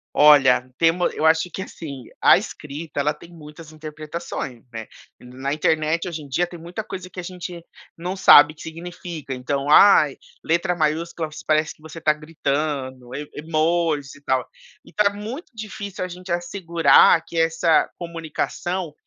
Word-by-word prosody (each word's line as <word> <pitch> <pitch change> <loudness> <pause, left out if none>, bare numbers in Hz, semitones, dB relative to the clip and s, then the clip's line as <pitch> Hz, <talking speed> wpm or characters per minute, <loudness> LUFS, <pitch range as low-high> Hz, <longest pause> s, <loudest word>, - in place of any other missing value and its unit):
Olha, 140 -4 +6
temos 170 +2 +2
eu - - -2
acho 160 +2 +3
que 190 - -4
assim, 140 -9 -8 0.2
a - - +7
escrita 150 +1 -7
ela 150 +2 +1
tem 170 - -15
muitas 155 -1 -12
interpretações, 155 -4 -7
né. 110 -1 -6 0.3
Na 130 +3 -5
internet 155 +3 0
hoje 165 -3 -5
em 145 - -11
dia 175 +7 0
tem 175 -1 -11
muita 175 +6 -6
coisa 185 -3 -8
que 185 - -9
a 180 - -5
gente 175 -1 -7 0.3
não 180 +3 -4
sabe 155 -5 +7
que 155 - -16
significa 165 -3 -7
então: 135 +2 -3
"Ai, 150 -4 +7 0.3
letra 170 +2 +1
maiúscula 160 0 -1 0.2
parece 155 0 +1
que - - -27
você 160 +1 -10
está 155 -1 +3
gritando, 140 -4 -3
e 145 +1 -6
emojis 155 -2 0
e 145 - -17
tal." 130 -2 -1 0.4
E - - -17
tá 210 -1 +3
muito 225 - -7
difícil 205 -3 -6
a - - -3
gente 180 0 -9
assegurar 170 -2 +4
que 170 - -7
essa 165 0 +3
comunicação 170 0 -4
160 Hz, 160 wpm, -22 LUFS, 150-175 Hz, 0.4 s, a